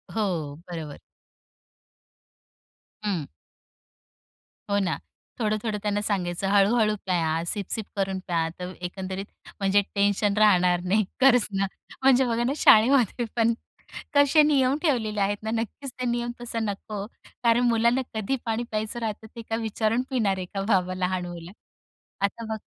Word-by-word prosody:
हो, 170 -9 -1
बरोबर. 160 -4 -6 2.1
हं. 175 -8 -1 1.4
हो 200 - +2
ना, 185 -4 0 0.4
थोडं-थोडं 215 -1 -1
त्यांना 205 0 0
सांगायचं, 195 -3 -1
हळू-हळू 210 +2 +4
प्या, 165 -3 0
सिप-सिप 205 +2 -3
करून 195 -1 -1
प्या. 165 -2 +1
तर 180 0 -5
एकंदरीत, 190 +1 -5 0.3
म्हणजे 200 +1 +3
टेन्शन 200 0 +2
राहणार 180 -4 +4
नाही, 200 +3 +2 0.2
खरंच 250 -4 +5
ना. 195 - +2 0.4
म्हणजे 265 -1 +5
बघा 235 0 0
ना, 265 +3 +1
शाळेमध्ये 240 -1 +5
पण 230 0 +3 0.6
कसे 285 +2 +6
नियम 275 -3 +3
ठेवलेले 225 - 0
आहेत 205 +1 +1
ना. 220 - -2
नक्कीच 265 +4 -6
ते 250 - -1
नियम 240 0 -1
तसा 230 -1 -3
नको, 205 -1 -4 0.4
कारण 235 +1 +4
मुलांना 235 +3 +3
कधी 220 +4 -1
पाणी 225 +1 -1
प्यायचं 215 +2 -2
राहतं, 220 -1 -4
ते 230 - -6
काय 225 - 0
विचारून 220 +2 0
पिणार 215 -8 +1
आहे 185 - -4
का, 195 +2 -5
बाबा, 185 -3 +2
लहान 185 0 -1
मुलं. 175 0 -8 0.7
आता 200 +4 -1
बघा 220 -1 -4
210 Hz, 140 wpm, -26 LUFS, 190-230 Hz, 2.1 s, कसे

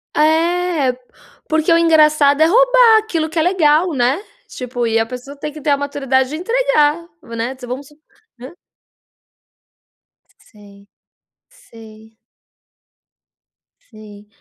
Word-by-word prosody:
É. 320 -2 +1
P 250 0 -21 0.5
porque 315 +1 0
o 330 - +5
engraçado 305 -3 +3
é - - +6
roubar, - - +4
aquilo 340 -8 -2
que 325 - -8
é - - +3
legal, 335 -1 +2
né? 265 +7 0 0.2
Tipo, 245 -2 -5
e 225 0 0
a 225 - 0
pessoa 250 +4 -10
tem 300 +2 -6
que 305 +1 -11
ter 295 - -2
a 280 - +2
maturidade 270 -2 -1
de 300 - -6
entregar, 345 -7 0
né. 230 -1 -6
Vamos 260 +3 -7
su 295 - -21 0.4
né? 255 +5 -11 2.0
Sei, 200 -2 -19 0.6
sei. 220 - -17 1.7
Sei. 210 -1 -15
295 Hz, 125 wpm, -17 LUFS, 245-335 Hz, 2.0 s, é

